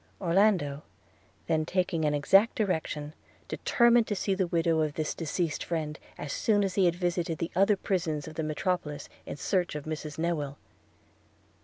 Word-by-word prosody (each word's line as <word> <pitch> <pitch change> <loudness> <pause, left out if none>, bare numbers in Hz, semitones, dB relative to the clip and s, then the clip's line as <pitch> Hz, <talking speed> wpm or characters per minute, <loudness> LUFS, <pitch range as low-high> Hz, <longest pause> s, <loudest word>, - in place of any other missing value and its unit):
Orlando 175 -6 +2 0.6
then 160 -1 +1
taking 175 -1 0
an 150 0 +2
exact 195 +10 +4
direction 160 -7 -2 0.3
determined 235 -1 +3
to 205 - -1
see 195 0 0
the 190 -1 0
widow 165 -1 +1
of 150 -2 -1
his 155 -1 -1
deceased 165 0 -2
friend, 155 -2 -3 0.2
as 145 - -5
soon 205 -2 +2
as 195 -2 -1
he 190 -1 +3
had 170 -1 +3
visited 175 -2 -1
the 165 - -3
other 195 +2 +4
prisons 165 -7 -1
of 160 - -7
the 160 - -3
metropolis 155 -1 -2 0.2
in - - -5
search 180 0 0
of 150 - -5
Mrs 155 -1 -5
Newill. 160 -4 -1
170 Hz, 165 wpm, -29 LUFS, 155-190 Hz, 0.6 s, exact